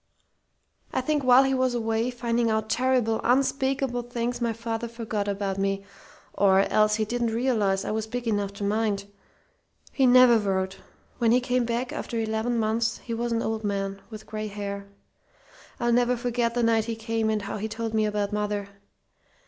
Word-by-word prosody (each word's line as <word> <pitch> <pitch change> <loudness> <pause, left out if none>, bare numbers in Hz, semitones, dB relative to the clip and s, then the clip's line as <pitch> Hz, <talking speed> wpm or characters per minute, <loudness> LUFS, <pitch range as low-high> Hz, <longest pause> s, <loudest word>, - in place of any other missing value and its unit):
"I - - 0
think 295 +2 0
while 255 +1 +7
he 270 0 +1
was 255 -1 +1
away, 225 0 0
finding 235 -1 0
out 220 0 -1
terrible, 250 -3 +1
unspeakable 265 0 +1
things, 240 0 -3
my 235 -1 +1
father 230 +1 -4
forgot 225 -3 -4
about 200 -1 -2
me 195 0 -1 0.5
or 195 -1 +4
else 215 +1 +3
he 215 0 0
didn't 240 +2 -1
realize 215 -6 +1
I - - -2
was 220 0 -2
big 245 +1 -4
enough 205 -2 0
to 200 - -7
mind. 205 -1 0 0.9
He 265 -2 +3
never 245 -2 +7
wrote. 190 -2 -1 0.4
When 230 -1 +3
he 245 - +5
came 250 -1 0
back, 240 +2 -2
after 235 - -4
eleven 220 +2 -1
months, 225 0 0
he 235 - -5
was 235 +1 -2
an 230 0 0
old 220 0 -2
man, 195 -1 -2
with 215 -2 -9
gray 215 0 -5
hair. 200 -1 -5 0.9
I'll 240 0 +1
never 245 +1 +3
forget 240 -1 -1
the 240 - +1
night 225 -1 +3
he 230 0 -3
came, 225 0 -1
and 215 -1 0
how 200 - -4
he 215 +1 -3
told 225 0 -4
me 215 -1 +2
about 205 -1 -2
mother. 210 -1 -2
225 Hz, 180 wpm, -26 LUFS, 210-240 Hz, 0.9 s, while